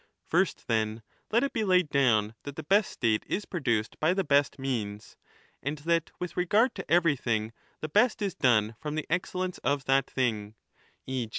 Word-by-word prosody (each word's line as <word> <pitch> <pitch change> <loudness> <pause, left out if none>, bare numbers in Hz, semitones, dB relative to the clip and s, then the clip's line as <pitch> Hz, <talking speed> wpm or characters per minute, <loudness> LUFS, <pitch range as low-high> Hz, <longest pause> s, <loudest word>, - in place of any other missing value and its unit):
First, - - 0
then, 110 0 -1 0.3
let 235 +4 +3
it 280 - -1
be 225 - 0
laid 185 -5 +3
down 110 -7 +3
that 145 -1 -8
the 160 - -6
best 195 +6 +3
state 110 -3 0
is 205 - -2
produced 120 - -1
by 160 +4 +2
the 195 - +1
best 145 -3 +2
means, 110 -6 -4 0.5
and 145 +3 -3
that 165 +2 0
with 180 - -5
regard 210 +8 +2
to - - -8
everything 130 -10 +2 0.3
the 155 - -2
best 215 +9 +3
is 200 -4 -1
done 110 -3 +2
from 150 0 -4
the 155 - -2
excellence 185 +1 -2
of 140 -1 -1
that 135 0 +2
thing 110 -5 -1 0.5
(e. 130 -4 -3
145 Hz, 180 wpm, -28 LUFS, 115-180 Hz, 0.5 s, let